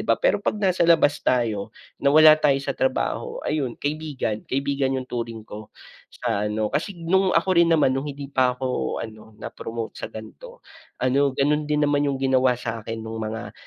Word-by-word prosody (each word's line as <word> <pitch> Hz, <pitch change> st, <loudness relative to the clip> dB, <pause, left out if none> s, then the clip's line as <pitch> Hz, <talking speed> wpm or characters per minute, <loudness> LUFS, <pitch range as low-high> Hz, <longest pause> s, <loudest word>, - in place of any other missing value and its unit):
ba? -, -, +3 dB
Pero -, -, +1 dB
pag -, -, -1 dB
nasa 190 Hz, -3 st, 0 dB
labas 155 Hz, -3 st, +4 dB
tayo, 115 Hz, -5 st, 0 dB, 0.3 s
na 140 Hz, -, +3 dB
wala 155 Hz, +2 st, +8 dB
tayo 140 Hz, -3 st, +4 dB
sa -, -, -2 dB
trabaho, -, -, -1 dB
ayun 135 Hz, -6 st, -2 dB
kaibigan 145 Hz, -7 st, -3 dB
kaibigan 135 Hz, 0 st, 0 dB
yung 130 Hz, -, -3 dB
turing 115 Hz, -3 st, -5 dB
ko 105 Hz, 0 st, -10 dB, 0.4 s
sa 105 Hz, -4 st, -2 dB
ano, 105 Hz, 0 st, -2 dB
kasi 180 Hz, +5 st, -2 dB
nung 190 Hz, +2 st, +2 dB
ako 170 Hz, +3 st, +1 dB
rin 170 Hz, -1 st, +5 dB
naman 155 Hz, -5 st, +3 dB
nung 135 Hz, +3 st, -2 dB
hindi 140 Hz, -1 st, -7 dB
pa 125 Hz, -2 st, +2 dB
ako 130 Hz, -1 st, -2 dB
ano 110 Hz, -1 st, -13 dB
na -, -, -8 dB
promote 115 Hz, 0 st, -6 dB
sa -, -, -5 dB
ganito 480 Hz, -, -11 dB, 0.4 s
ano 135 Hz, +2 st, +2 dB
ganon 150 Hz, +2 st, +1 dB
din 150 Hz, 0 st, +1 dB
naman 145 Hz, 0 st, +2 dB
yung 140 Hz, -, -1 dB
ginawa 130 Hz, -2 st, +3 dB
sakin 115 Hz, -1 st, -5 dB
nung 110 Hz, 0 st, -6 dB
mga, 110 Hz, 0 st, -5 dB
135 Hz, 185 wpm, -23 LUFS, 115-150 Hz, 0.4 s, wala